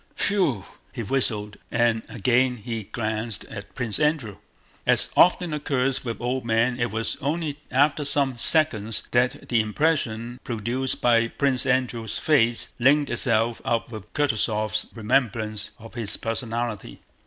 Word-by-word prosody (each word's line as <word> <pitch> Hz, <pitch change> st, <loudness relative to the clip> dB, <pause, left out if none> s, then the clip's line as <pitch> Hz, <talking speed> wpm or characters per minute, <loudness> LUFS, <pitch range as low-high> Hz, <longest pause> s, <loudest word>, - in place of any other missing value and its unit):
whew!" 170 Hz, -, +2 dB, 0.3 s
he 120 Hz, -3 st, -5 dB
whistled, 105 Hz, -4 st, -1 dB
and 115 Hz, -1 st, +1 dB
again 120 Hz, -2 st, 0 dB
glanced 110 Hz, -1 st, -3 dB
at 100 Hz, -3 st, -10 dB
Prince 120 Hz, -3 st, 0 dB
Andrew. 150 Hz, -9 st, 0 dB, 0.5 s
As -, -, +3 dB
often 175 Hz, -2 st, +4 dB
occurs 135 Hz, -3 st, -1 dB
with 115 Hz, -3 st, -5 dB
old 125 Hz, +1 st, -1 dB
men, 115 Hz, +2 st, +1 dB
it 120 Hz, 0 st, 0 dB
was 110 Hz, +2 st, -2 dB
only 150 Hz, 0 st, -2 dB
after 145 Hz, +3 st, +2 dB
some 140 Hz, -2 st, +2 dB
seconds 115 Hz, -8 st, +4 dB
that 125 Hz, +1 st, 0 dB
the 115 Hz, -2 st, +3 dB
impression 120 Hz, -1 st, -1 dB
produced 120 Hz, +3 st, -3 dB
by 115 Hz, -1 st, +3 dB
Prince 135 Hz, +1 st, +1 dB
Andrew's 125 Hz, -4 st, -1 dB
face 120 Hz, -6 st, +2 dB
linked 140 Hz, +3 st, +3 dB
itself 115 Hz, -2 st, +2 dB
up 115 Hz, 0 st, -1 dB
with 110 Hz, -6 st, -9 dB
Kutúzov's 110 Hz, -5 st, 0 dB
remembrance 110 Hz, -2 st, -1 dB
of 115 Hz, 0 st, -13 dB
his 115 Hz, -4 st, -2 dB
personality. 115 Hz, -, -4 dB
120 Hz, 130 wpm, -24 LUFS, 110-135 Hz, 0.5 s, often